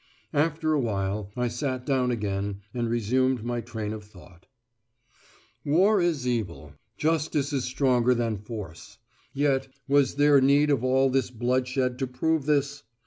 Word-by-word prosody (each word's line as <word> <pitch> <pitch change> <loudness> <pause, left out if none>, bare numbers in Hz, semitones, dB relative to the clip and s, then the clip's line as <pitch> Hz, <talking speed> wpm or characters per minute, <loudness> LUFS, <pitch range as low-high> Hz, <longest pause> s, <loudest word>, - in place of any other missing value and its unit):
After 155 +1 +1
a 150 - +2
while 100 -3 -2
I 125 0 +1
sat 125 +1 -3
down 130 -3 +1
again 100 -3 -2
and 120 -2 -2
resumed 120 +2 +1
my 120 0 -2
train 110 -2 -5
of 110 -1 -7
thought: 95 -3 -17 1.2
War 190 +7 +3
is 160 -7 0
evil. 95 -11 -3 0.2
Justice 150 -2 0
is 135 -3 0
stronger 125 -1 +2
than 115 -3 -1
Force. 105 -6 -9 0.3
Yet, 135 -1 +1 0.2
was 140 -2 +3
there 145 -1 +5
need 140 +2 +4
of 130 -4 +1
all 130 +1 +3
this 130 -1 +1
bloodshed 125 +1 -1
to 135 - -1
prove 145 +4 -1
this? 145 -1 +1
130 Hz, 145 wpm, -26 LUFS, 115-140 Hz, 1.2 s, there